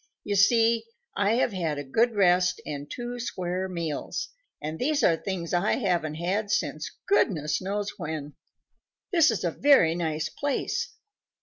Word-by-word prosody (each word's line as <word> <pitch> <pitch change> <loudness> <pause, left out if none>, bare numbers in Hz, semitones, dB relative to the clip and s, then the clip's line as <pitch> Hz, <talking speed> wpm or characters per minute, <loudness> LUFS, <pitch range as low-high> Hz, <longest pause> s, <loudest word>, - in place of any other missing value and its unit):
You 205 - -1
see, 230 +3 +4 0.3
I 205 +2 +2
have 235 -2 +1
had 165 -5 -1
a 145 - -3
good 225 - +1
rest 180 -2 +3
and 145 -1 -6
two 245 0 -5
square 185 -5 -3
meals, 170 -4 -3 0.3
and 155 +2 -5
these 295 +3 +1
are 165 - +5
things 175 0 -4
I 175 +4 +2
haven't 175 - 0
had 190 +6 -1
since 215 - -1 0.2
goodness 155 - +2
knows 200 +2 -3
when. 150 -2 -5 0.8
This 335 -5 +5
is 225 - -1
a 170 - +1
very 260 - +5
nice 160 -2 -1
place. 290 - -2
185 Hz, 150 wpm, -27 LUFS, 160-230 Hz, 0.8 s, are